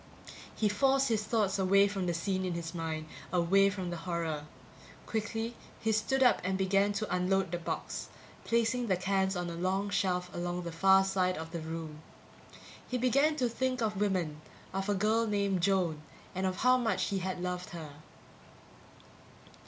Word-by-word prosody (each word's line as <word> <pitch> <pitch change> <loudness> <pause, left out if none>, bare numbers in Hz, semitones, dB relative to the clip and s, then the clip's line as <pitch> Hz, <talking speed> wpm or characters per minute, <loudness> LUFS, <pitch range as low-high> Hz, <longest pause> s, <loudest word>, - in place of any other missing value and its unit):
He 215 - +2
forced 270 +6 +3
his 220 -2 +1
thoughts 210 -4 +1
away 195 +1 +5
from 195 -2 -2
the 175 - +1
scene 185 +2 -1
in 180 -2 -2
his 165 -1 -5
mind 160 -2 -3 0.3
away 185 +3 +4
from 190 -3 -4
the 175 - -3
horror; 165 -3 -3 0.6
quickly 225 +1 -3 0.2
he 220 - 0
stood 220 +5 +2
up 250 - +4
and 190 +1 0
began 195 +1 +2
to 205 -2 -1
unload 185 0 +1
the 175 - -2
box, 170 - -4 0.3
placing 235 +1 +1
the 190 - +3
cans 190 +1 +1
on 175 0 -2
a 170 - -4
long 190 +3 -1
shelf 180 -2 0
along 175 0 -3
the 170 - -5
far 190 +3 +5
side 185 -1 +1
of 160 +1 -6
the 170 - -4
room. 160 -1 -6 0.9
He 250 - 0
began 275 +5 +3
to 255 -5 +1
think 255 +2 -1
of 210 -3 -1
women, 175 -7 0 0.3
of 195 +1 -2
a 205 - +2
girl 220 +3 +2
named 200 -3 +1
Joan, 175 -5 +1 0.3
and 190 0 -1
of 185 - -1
how 255 0 +6
much 230 -2 0
he 195 - 0
had 185 0 -3
loved 180 0 -3
her 160 -4 -8
190 Hz, 175 wpm, -31 LUFS, 175-215 Hz, 0.9 s, how